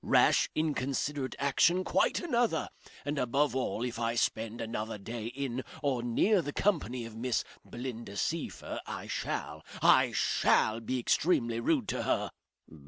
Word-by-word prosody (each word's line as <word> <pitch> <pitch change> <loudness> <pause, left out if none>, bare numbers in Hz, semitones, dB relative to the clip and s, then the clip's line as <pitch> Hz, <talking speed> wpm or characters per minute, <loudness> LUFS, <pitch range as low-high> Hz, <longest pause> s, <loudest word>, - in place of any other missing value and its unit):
Rash, - - +4
inconsiderate 140 -2 -1
action 165 +6 +3
quite - - +2
another. 240 - +1 0.4
And 145 0 -1
above 135 +3 +1
all, 130 -3 -1
if 120 -1 -4
I 115 0 0
spend 115 0 -1
another 110 -1 -3
day 115 +2 -6
in 130 0 -3 0.2
or 135 -4 +1
near 175 - +3
the 145 - -4
company 140 - 0
of 115 -1 -9
Miss 120 +1 0 0.2
Belinda 120 -4 -6
Seyffert 165 +8 -3
I - - -5
shall - - -4 0.2
I - - +5
shall 110 +1 +2
be 125 +3 -2
extremely 120 -3 +2
rude 115 - +1
to - - -1
her." - - 0
125 Hz, 145 wpm, -31 LUFS, 115-145 Hz, 0.4 s, I